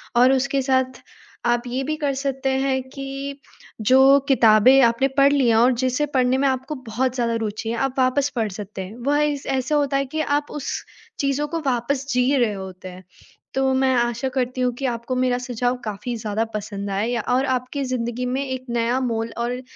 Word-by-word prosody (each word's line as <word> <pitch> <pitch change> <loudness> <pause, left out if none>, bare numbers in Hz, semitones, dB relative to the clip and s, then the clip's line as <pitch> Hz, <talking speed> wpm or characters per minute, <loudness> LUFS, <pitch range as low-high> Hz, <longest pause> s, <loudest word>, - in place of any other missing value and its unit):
और 250 +2 +6
उसके 275 +1 +1
साथ 260 -1 0 0.4
आप 240 0 +2
ये 255 +2 -2
भी 310 +3 -2
कर 285 -3 -1
सकते 270 0 -2
हैं 265 0 +1
कि, 275 +1 -6 0.4
जो 265 +4 +6
किताबें 255 +1 +6
आपने 235 +3 +3
पढ़ 275 0 +6
ली 270 -4 +3
हैं 225 - +4
और 245 +3 +5
जिसे 255 +3 +1
पढ़ने 255 0 +3
में 275 +1 +2
आपको 260 +3 -2
बहुत 250 +3 -1
ज़्यादा 235 -2 0
रूचि 215 +2 -4
है 235 - -1
आप 270 0 -1
वापस 265 +2 +2
पढ़ 220 -3 0
सकते 200 0 -7
हैं। 205 +5 -10
वह 290 +1 +2
इस 290 -2 -2
ऐसा 265 +2 0
होता 285 -2 +1
है 275 - 0
कि 315 - +1 0.2
आप 295 - -17
उस 295 -2 -4 0.5
चीज़ों 280 +1 0
को 330 +2 -3
वापस 260 +2 0
जी 250 +3 +2
रहे 235 -4 +2
होते 190 -1 -8
हैं। 185 +1 -12 0.5
तो 265 0 +2
मैं 260 0 +2
आशा 240 +1 0
करती 255 -1 -2
हूँ 250 0 +2
कि 275 - -2
आपको 235 +2 -4
मेरा 255 -1 +1
सुझाव 245 0 -1
काफ़ी 215 +4 -4
ज़्यादा 215 -1 -2
पसंद 205 -1 -4
आए, 200 +4 0
या 240 -2 -1
और 255 +2 +2
आपकी 260 +2 -2
ज़िन्दगी 250 -1 -2
में 260 +2 -1
एक 260 -1 -5
नया 235 +2 0
मोल 230 -2 -2
और 245 +2 -2
255 Hz, 205 wpm, -22 LUFS, 235-270 Hz, 0.5 s, और